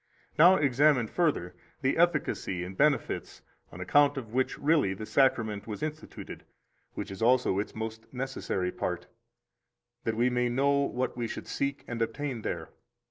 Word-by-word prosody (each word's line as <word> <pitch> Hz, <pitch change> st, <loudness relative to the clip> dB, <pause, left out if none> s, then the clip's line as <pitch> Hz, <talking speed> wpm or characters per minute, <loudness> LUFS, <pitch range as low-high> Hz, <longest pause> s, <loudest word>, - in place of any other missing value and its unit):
Now 180 Hz, +4 st, +8 dB
examine 140 Hz, -3 st, +3 dB
further 125 Hz, -, 0 dB, 0.3 s
the 130 Hz, -, +2 dB
efficacy 155 Hz, -, +1 dB
and 95 Hz, +2 st, -7 dB
benefits 150 Hz, +5 st, 0 dB, 0.3 s
on -, -, -10 dB
account 145 Hz, +10 st, +3 dB
of 115 Hz, -4 st, -6 dB
which 130 Hz, +1 st, 0 dB
really 145 Hz, -10 st, +2 dB
the 110 Hz, -, -6 dB
Sacrament 115 Hz, -6 st, +1 dB
was 110 Hz, +7 st, -5 dB
instituted; 155 Hz, 0 st, -6 dB, 0.5 s
which -, -, -5 dB
is 95 Hz, -, -8 dB
also 120 Hz, -4 st, +3 dB
its 105 Hz, -, -4 dB
most 110 Hz, 0 st, -6 dB
necessary 125 Hz, -8 st, -2 dB
part, -, -, -3 dB, 1.0 s
that 110 Hz, -1 st, -1 dB
we 125 Hz, +2 st, +3 dB
may 125 Hz, 0 st, +1 dB
know 135 Hz, +4 st, +2 dB
what 130 Hz, -2 st, -1 dB
we 120 Hz, -1 st, -2 dB
should -, -, -6 dB
seek 140 Hz, 0 st, -2 dB
and 120 Hz, -1 st, -4 dB
obtain 130 Hz, 0 st, -2 dB
there. -, -, -4 dB
125 Hz, 155 wpm, -29 LUFS, 110-140 Hz, 1.0 s, Now